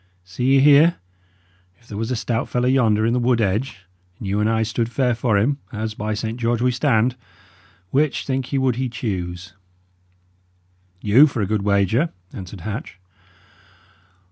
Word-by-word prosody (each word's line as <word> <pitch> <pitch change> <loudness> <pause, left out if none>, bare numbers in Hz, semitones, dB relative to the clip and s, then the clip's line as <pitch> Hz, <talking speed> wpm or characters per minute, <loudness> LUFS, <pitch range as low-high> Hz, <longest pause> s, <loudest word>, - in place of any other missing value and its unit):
See 125 +9 0
ye - - +5
here: 150 +4 +6 0.8
if 115 - -26
there 100 - -7
was 115 +1 -3
a 130 - -1
stout 115 0 -2
fellow 125 0 0
yonder 115 -5 +3
in 115 - +1
the 125 - +1
wood 120 -1 +2
edge, 105 0 -2 0.3
and - - -9
you 100 +2 0
and 105 +1 +2
I 110 0 +1
stood 115 +1 -2
fair 125 0 +1
for 115 -3 +1
him 135 +8 +1
as, 110 0 -4
by 110 0 -3
Saint 110 +2 -4
George, 120 0 0
we 125 +1 +2
stand! 120 0 +1 0.8
which, 145 +1 +1
think 130 -2 -3
ye, 140 - 0
would 130 -3 +1
he 130 -1 -1
choose?" 90 -6 -5 1.5
"You, 120 +9 +6
for 125 -6 -2
a - - +1
good 105 +1 -1
wager," 100 - +1 0.2
answered 95 0 -9
Hatch. 110 - -6
115 Hz, 170 wpm, -21 LUFS, 105-130 Hz, 1.5 s, here